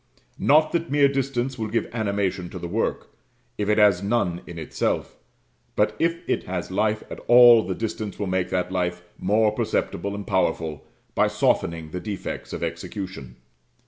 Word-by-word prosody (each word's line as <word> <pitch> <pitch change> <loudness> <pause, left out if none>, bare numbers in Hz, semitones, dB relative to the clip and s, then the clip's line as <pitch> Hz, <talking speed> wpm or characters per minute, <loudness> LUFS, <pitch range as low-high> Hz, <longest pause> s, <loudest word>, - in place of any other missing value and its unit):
Not 155 +2 +4
that 170 -1 -1
mere 145 0 +5
distance 135 -2 -2
will 110 - -1
give 115 +2 -1
animation 100 -5 -1
to - - -8
the 85 - -5
work, - - -2 0.5
if 105 0 0
it 105 - +3
has 100 -4 +5
none 100 -5 0
in 85 - -8
itself; 80 - -2 0.6
but - - +2
if 170 0 0
it - - -1
has 90 0 -4
life 105 +2 0
at - - -6
all, 120 -1 +9
the - - -3
distance 110 -2 -4
will 105 - -2
make 95 -1 -1
that 90 0 -1
life 90 -1 -1 0.2
more 105 +3 +3
perceptible 100 -2 -2
and 100 0 -6
powerful 80 -5 -1 0.3
by - - +3
softening 80 -2 0
the 90 - -4
defects 100 0 -5
of - - -4
execution. 90 - -6
100 Hz, 170 wpm, -24 LUFS, 90-115 Hz, 0.6 s, all